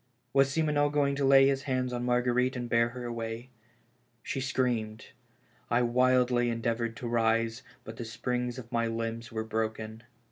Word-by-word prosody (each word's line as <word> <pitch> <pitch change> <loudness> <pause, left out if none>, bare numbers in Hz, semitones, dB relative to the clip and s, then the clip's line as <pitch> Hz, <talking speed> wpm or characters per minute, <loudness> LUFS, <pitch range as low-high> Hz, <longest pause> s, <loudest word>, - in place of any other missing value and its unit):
Was 135 0 +4
Simoneau 150 -2 +2
going 145 -1 +1
to 140 - -1
lay 135 0 +7
his 135 -1 +1
hands 130 -1 0
on 120 0 -2
Marguerite 125 +1 +1
and 120 -1 -3
bear 115 0 +3
her 125 +1 -7
away? 115 +1 -5 0.7
She 135 - -3
screamed. 120 -5 -1 0.6
I 120 +2 +3
wildly 125 0 +3
endeav 115 0 -1
ored 115 -1 -3
to 120 - -6
rise, 115 0 +1 0.2
but 110 0 -9
the - - -4
springs 125 +2 -3
of 120 -2 -9
my 115 -1 +1
limbs 115 +1 -4
were 110 -1 -2
broken. 110 0 -3
120 Hz, 170 wpm, -29 LUFS, 115-130 Hz, 0.7 s, lay